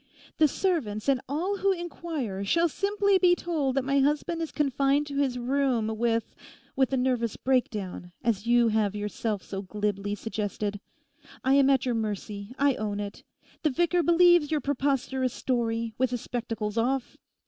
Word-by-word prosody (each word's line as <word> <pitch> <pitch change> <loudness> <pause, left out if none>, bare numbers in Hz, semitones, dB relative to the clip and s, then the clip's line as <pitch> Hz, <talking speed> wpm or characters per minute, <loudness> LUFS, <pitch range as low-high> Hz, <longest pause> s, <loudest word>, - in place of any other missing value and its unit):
The 310 - +6
servants 280 - -1
and 270 -2 +3
all 355 +8 -1
who 395 0 +2
inquire 325 - -4
shall 335 +12 +3
simply 400 +3 +1
be 355 -1 +5
told 305 -7 -1
that 270 -1 0
my 275 +1 +2
husband 300 +4 +1
is 325 - -3
confined 280 0 +1
to 285 -1 -6
his 270 -3 +1
room 250 -3 0
with—with 235 +3 -2
a 265 - +1
nervous 250 -3 0
breakdown, 210 -9 -1
as 225 -1 0
you 240 -1 +4
have 210 -2 +1
yourself 210 0 -3
so 195 -1 -5
glibly 205 0 -2
suggested. 205 -1 -3 0.6
I 265 - +3
am 275 -1 +5
at 270 -2 +3
your 250 - +1
mercy, 210 0 -4
I 280 0 +3
own 205 -1 -3
it. 205 0 -6 0.4
The 310 - +2
vicar 345 +5 +2
believes 345 -2 +5
your 310 - +1
preposterous 265 -2 -1
story—with 230 0 -1
his 245 -1 -3
spectacles 225 -2 -3
off. 255 +2 -1
255 Hz, 160 wpm, -27 LUFS, 220-295 Hz, 0.6 s, The